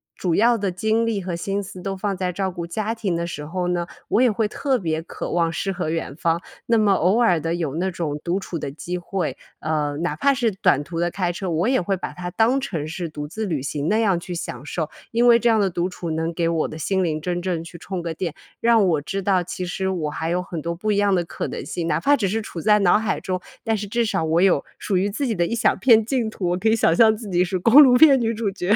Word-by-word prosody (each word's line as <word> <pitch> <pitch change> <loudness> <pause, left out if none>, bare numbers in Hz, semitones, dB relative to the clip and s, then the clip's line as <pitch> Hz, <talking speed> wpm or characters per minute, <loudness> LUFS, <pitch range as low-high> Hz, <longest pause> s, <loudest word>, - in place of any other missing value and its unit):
主 175 -3 -1
要 235 +2 +4
的 200 -2 -1
精 220 +5 0
力 220 -4 -1
和 180 -1 -4
心 200 +3 -2
思 185 -1 -9
都 195 +1 -3
放 195 0 -2
在 180 -1 -2
照 190 0 -2
顾 170 -1 -6
家 215 +5 -2
庭 210 -6 -2
的 170 0 -2
时 150 -3 -6
候 180 +2 -2
呢， 175 -1 -1 0.2
我 230 - +3
也 255 - +5
会 215 -1 0
特 270 +2 0
别 160 -6 -2
渴 165 - -6
望 165 -1 +1
诗 195 +4 -2
和 175 -4 -3
远 165 -3 -3
方。 165 0 0 0.2
那 230 - +3
么 215 -2 +3
偶 195 +5 +3
尔 180 -8 +4
地 165 +2 -2
有 160 -5 -3
那 185 +3 0
种 160 -5 -3
独 175 +2 -1
处 180 -4 -5
的 - - -4
机 175 +5 -5
会， 180 -1 -3 0.2
呃， 150 -2 -1
哪 170 -3 -2
怕 280 - +3
是 235 -3 +1
短 145 -7 +2
途 165 +2 -5
的 175 0 +1
开 180 -1 -1
车， 185 +1 -4
我 170 +7 +1
也 260 - +3
会 195 +2 0
把 185 - -5
它 175 0 -6
当 235 +8 +2
成 165 - -3
是 170 +1 -4
独 150 -1 -7
自 220 +6 -4
旅 155 -8 -2
行 145 +2 -3
那 215 +4 +2
样 195 -6 +2
去 175 0 -6
享 130 -5 -6
受。 155 +1 -3 0.2
因 235 +1 +2
为 235 -1 +7
这 240 - +1
样 225 -1 +4
的 200 -2 +2
独 175 0 -1
处 175 -2 -6
能 165 +1 -2
给 165 0 0
我 165 -2 0
的 155 - -8
心 190 +4 0
灵 155 -4 -1
真 175 +1 -2
正 175 -3 -2
去 170 +1 -10
充 185 +1 -5
个 170 -1 -4
电， 165 -1 -3 0.3
让 230 -3 +4
我 160 -5 +1
知 195 +7 -4
道 190 -1 +2
其 180 +1 -5
实 190 +2 -3
我 170 -5 -1
还 160 +2 -3
有 180 +1 0
很 170 -4 -6
多 170 +2 -3
不 215 +5 -1
一 205 - +1
样 205 -1 +3
的 175 - +1
可 165 - -5
能 - - -6
性， 170 -2 -3
哪 - - 0
怕 285 +1 +4
只 205 - 0
是 220 +4 -1
处 180 -5 -7
在 210 +3 +4
脑 195 +1 +4
海 220 - -2
中， 185 -1 -2 0.2
但 225 -2 0
是 205 0 -5
至 235 +3 0
少 210 -7 0
我 160 +2 +2
有， 185 -7 +3
属 195 -3 -1
于 200 +3 +1
自 275 +8 -2
己 235 - 0
的 175 -3 +1
一 230 - -2
小 235 - +2
片 225 0 +5
净 235 -2 0
土， 185 -5 -3
我 180 - 0
可 215 - -1
以 220 - +4
想 185 -7 +3
象 220 +4 +5
自 215 -1 -8
己 180 0 +2
是， 185 +1 -2
公 230 +10 +7
路 255 -4 +7
片 275 0 +7
女 230 -1 0
主 215 -2 -2
角。 195 +1 +1
185 Hz, 305 characters per minute, -22 LUFS, 170-215 Hz, 0.3 s, 为